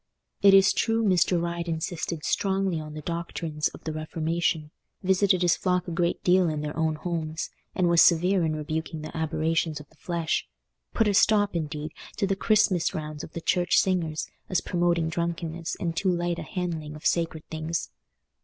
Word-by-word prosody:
It 200 -1 +8
is 195 0 +6
true, 225 0 +1
Mr. 180 -3 +3
Ryde 170 0 -3
insisted 165 -1 -3
strongly 190 -3 0
on 155 -1 -8
the 155 - -7
doctrines 165 -2 -2
of - - -11
the 160 - -3
Reformation, 155 0 -1 0.3
visited 190 -1 +3
his 175 -2 +4
flock 180 -1 0
a - - -4
great 170 0 0
deal 180 -1 +4
in 155 -1 -2
their 150 0 -4
own 160 -1 +1
homes, 160 -1 -3 0.2
and 180 -2 +2
was 170 -1 +5
severe 180 +2 +4
in 155 -1 0
rebuking 155 +1 -4
the 155 - -8
aberrations 160 0 0
of 150 - -12
the - - -25
flesh—put 170 +6 -3
a 205 - +2
stop, 205 -1 +4
indeed, 155 -2 -3 0.3
to 205 - +1
the 195 0 0
Christmas 195 -4 +2
rounds 155 -1 -5
of - - -10
the 170 - -5
church 175 +1 +2
singers, 170 -5 +1 0.2
as 185 - +2
promoting 175 -2 +1
drunkenness 170 0 -3
and 170 -2 -2
too 190 - +1
light 175 -1 0
a - - -4
handling 165 -5 -4
of 150 - -12
sacred 165 -2 0
things. 160 +1 -3
170 Hz, 180 wpm, -26 LUFS, 155-180 Hz, 0.3 s, It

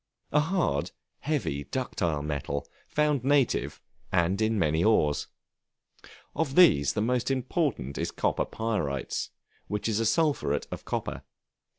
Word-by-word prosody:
A 150 - +4
hard, 155 - 0 0.3
heavy, 130 - -2
ductile 85 - -2
metal, 70 -1 -3 0.2
found 150 -4 +1
native, 140 -2 +2 0.3
and 95 +3 +2
in 110 0 +2
many 80 -2 +2
ores; 75 -9 +2 1.1
of 145 -4 -1
these 75 - +6
the 105 - 0
most 125 +2 0
important 130 - -1
is - - -1
copper - - 0
pyrites, 95 - -2 0.4
which 105 +1 -2
is 110 -1 +1
a 115 - +1
sulphuret 145 - +1
of - - -6
copper. - - -3
110 Hz, 125 wpm, -28 LUFS, -, 1.1 s, these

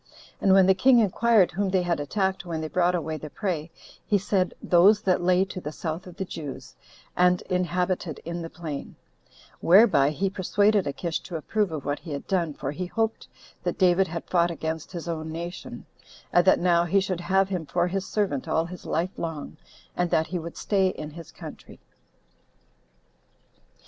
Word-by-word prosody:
And 195 - +4
when 190 -1 +7
the 190 - +6
king 250 +7 +5
inquired 220 -2 +4
whom 195 +3 -1
they 185 -1 +2
had 175 -2 0
attacked 190 +6 -1
when 170 -3 -4
they 155 - -3
brought 180 +2 +2
away 160 -2 -3
the 155 - -8
prey, 170 -3 -3 0.3
he 205 - +2
said, 190 -1 0
those 200 +5 +5
that 185 -2 +2
lay 180 +1 +3
to 185 -1 -7
the 150 - -5
south 160 +3 -5
of 180 - -11
the 190 - -3
Jews, 150 -6 -7 0.4
and 180 0 +3
inhabited 180 -2 -1
in 170 +1 -4
the 165 - -6
plain; 155 -5 -7 0.6
whereby 180 -7 +6
he 185 +6 -1
persuaded 200 0 +2
Achish 165 +4 -2
to 175 - -9
approve 200 +4 -1
of 155 -4 -5
what 145 0 -1
he 165 -4 -7
had 140 - -5
done, 170 -6 -1
for 135 - -4
he 180 +5 -4
hoped 225 +3 -2 0.3
that - - -2
David 185 0 +4
had 170 0 -5
fought 175 -1 +2
against 160 -1 -4
his 170 -3 -6
own 160 -1 -4
nation, 170 +3 -7 0.5
and 175 - +5
that - - +7
now 175 -1 +3
he 195 +4 +3
should 185 -2 -2
have 190 +2 +2
him 180 -5 -3
for 175 +3 +1
his 195 +1 -3
servant 190 -11 -1
all 160 +1 +1
his 180 0 -9
life 175 +4 -2
long, 160 -3 -5 0.4
and 175 -1 0
that 160 - +2
he 180 +1 -3
would 170 0 -8
stay 195 -2 +2
in 155 -4 -5
his 165 +1 -11
country. - - -11
175 Hz, 190 wpm, -26 LUFS, 160-190 Hz, 0.6 s, when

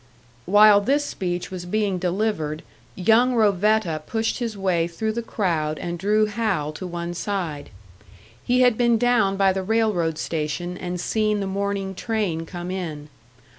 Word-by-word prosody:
While 205 +1 +7
this 280 +7 +1
speech 180 -5 -4
was 180 -1 -6
being 200 -1 0
delivered, 175 -4 -1 0.3
young 230 +6 +3
Rovetta 210 -5 +2
pushed 225 +1 -1
his 230 -4 -3
way 180 -4 +1
through 220 +6 -3
the 235 +2 -3
crowd 165 -9 -1
and 175 -1 -5
drew 210 +3 +2
Hal 205 -8 -1
to 185 +4 -6
one 170 0 -4
side. 175 -6 -4 0.7
He 250 +1 +2
had 245 -3 +4
been 235 -1 +4
down 220 -5 +2
by 195 -1 +3
the 190 - -2
railroad 190 -6 0
station 165 +3 -3
and 180 0 -5
seen 215 +2 0
the 200 - -2
morning 195 0 -2
train 190 -6 -2
come 175 0 -6
in. 155 -6 -5
195 Hz, 155 wpm, -23 LUFS, 175-215 Hz, 0.7 s, While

